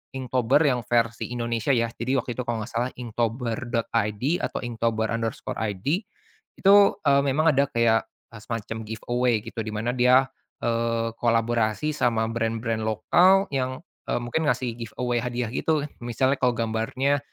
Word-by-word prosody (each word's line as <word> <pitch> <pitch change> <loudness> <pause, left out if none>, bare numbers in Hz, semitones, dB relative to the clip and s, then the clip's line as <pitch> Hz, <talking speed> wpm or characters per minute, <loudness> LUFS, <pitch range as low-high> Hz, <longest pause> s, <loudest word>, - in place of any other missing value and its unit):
inktober 130 +1 +1
yang 130 -4 +2
versi 115 -1 +1
Indonesia 115 -1 -2
ya, 115 -1 0
jadi 130 +3 -1
waktu 125 - -5
itu - - -1
kalau 115 -2 -1
enggak 120 - -12
salah 120 +2 0
inktober.id 115 -2 -2 0.2
atau - - -2
inktobar_id 110 -3 -2 0.7
itu, 195 +1 +6 0.3
eee, 140 -1 +5
memang 155 +4 +3
ada 140 +1 +3
kayak 115 -3 +2 0.3
semacam 115 0 -5
giveaway 120 +1 0
gitu, 115 0 -7
dimana 110 +2 -2
dia, 125 +1 +5 0.4
eee, 115 0 0
kolaborasi 115 +3 +1
sama 115 -5 +1
brand-brand 115 -1 -1
lokal 180 - +4
yang, 130 -1 -2 0.3
eee, - - 0
mungkin 150 +6 -1
ngasih 125 -5 0
giveaway 120 +1 -2
hadiah 125 -1 -2
gitu, 155 +3 0 0.2
misalnya 130 +3 +1
kalau 125 -1 +3
gambarnya, 115 +5 0
120 Hz, 135 wpm, -25 LUFS, 115-130 Hz, 0.7 s, itu